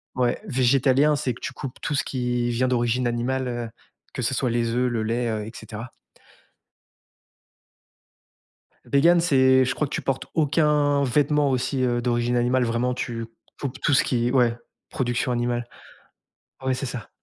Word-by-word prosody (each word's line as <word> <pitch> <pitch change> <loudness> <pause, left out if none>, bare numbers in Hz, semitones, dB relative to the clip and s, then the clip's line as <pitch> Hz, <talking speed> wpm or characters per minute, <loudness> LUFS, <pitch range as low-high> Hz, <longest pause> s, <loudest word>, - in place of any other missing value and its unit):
ouais, 125 -1 0
végétalien, 135 - +3
c'est 130 -3 -2
que - - -15
tu - - -5
coupes 135 -4 -7
tout 150 - -2
ce 140 - +1
qui 125 -2 -1
vient 120 +2 +1
d'origine 120 0 +1
animale, 125 +2 -1
heu, 120 -2 -4 0.4
que 125 - -3
ce 125 - 0
soit 125 -1 0
les 115 0 0
œufs, 125 +1 +1
le 115 -2 -1
lait, 115 +2 -1
heu, 110 -2 -2
et - - -7
cetera. 110 +2 -8 2.9
Végan, 170 +5 +4
c'est, 130 -5 +4
je 125 - -1
crois 150 - -1
que 140 - -8
tu - - -2
portes 135 -1 -2
aucun 150 -2 +2
vêtement 145 +2 +2
aussi, 130 +1 -1
heu, 120 -1 +1
d'origine 120 0 0
animale. 125 +1 +2
Vraiment, 120 +2 0
tu 115 -2 -4 0.3
coupes 135 -3 -4
tout 145 - +3
ce 145 +5 +4
qui 120 -4 0
ouais, 120 -3 +3 0.3
production 120 0 -1
animale. 120 0 -1 1.0
Ouais, 130 0 +1
c'est 135 +2 -4
ça. 125 -2 -6
125 Hz, 165 wpm, -24 LUFS, 120-135 Hz, 2.9 s, Végan